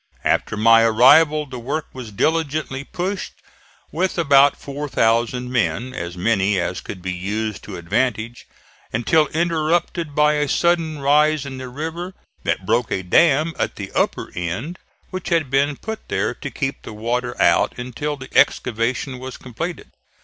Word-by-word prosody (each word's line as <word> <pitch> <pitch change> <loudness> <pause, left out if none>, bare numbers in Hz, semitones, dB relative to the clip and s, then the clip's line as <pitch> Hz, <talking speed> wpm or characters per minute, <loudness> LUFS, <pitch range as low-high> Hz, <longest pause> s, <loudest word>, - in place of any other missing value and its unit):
After 110 - 0
my 115 +1 +6
arrival 140 +7 +5
the 130 -3 -8
work 150 +6 -3
was 125 -4 -8
diligently 150 +2 -1
pushed 185 +6 -4 0.6
with 185 +4 -1
about 140 -3 +5
4,000 125 -3 0
men 125 +1 0
as 85 -2 -6
many 100 0 +1
as 90 +1 -2
could 95 -3 -8
be 95 0 -2
used 105 +4 -3
to 100 -3 -7
advantage 115 +6 -2 0.4
until 150 +7 +2
interrupted 165 -1 0
by 150 0 +4
a 150 -1 0
sudden 165 -2 +1
rise 150 +1 +3
in 135 -2 -7
the 130 -1 -6
river 165 +7 -5 0.3
that - - -2
broke 120 -2 +1
a 95 - -1
dam 155 - +3
at - - -1
the 100 -2 -7
upper - - -1
end, 95 - -4 0.3
which 185 -1 -5
had 165 -6 +1
been 140 +1 +2
put 220 0 -7
there - - -1
to - - -7
keep - - -3
the - - -9
water 120 +3 -2
out - - +3
until 125 +4 -4
the 130 -1 -11
excavation 125 +3 +1
was 130 0 -7
completed. 165 +8 -6
130 Hz, 155 wpm, -21 LUFS, 115-155 Hz, 0.6 s, my